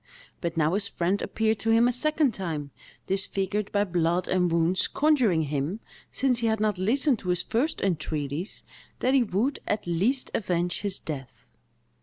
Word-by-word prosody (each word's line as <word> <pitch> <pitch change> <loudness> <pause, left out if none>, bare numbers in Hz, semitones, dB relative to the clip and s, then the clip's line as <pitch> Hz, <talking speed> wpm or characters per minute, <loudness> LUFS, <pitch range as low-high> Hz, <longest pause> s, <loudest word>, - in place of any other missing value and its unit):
But 170 -1 -3
now 160 +1 +2
his 200 +1 0
friend 190 +1 -1
appeared 220 -1 0
before 225 0 +2
him 230 +2 +5
a - - +3
second 300 +1 +2
time, 155 -7 -4 0.3
disfigured 195 +1 -1
by 205 0 +2
blood 175 -1 0
and 180 -2 +2
wounds, 170 +2 +2
conjuring 255 - +3
him, 150 +7 -2 0.3
since 255 -3 +1
he 230 - +1
had 220 -1 +1
not 210 -3 0
listened 250 +5 +2
to 180 - -6
his 180 -1 +1
first 255 +7 -1
entreaties, 155 -2 -2 0.3
that 255 - +1
he 270 - +5
would, 235 +5 0
at 210 - -1
least, 200 +11 0
avenge 175 -3 0
his 200 -1 0
death. 135 -5 -7
195 Hz, 170 wpm, -27 LUFS, 170-230 Hz, 0.3 s, him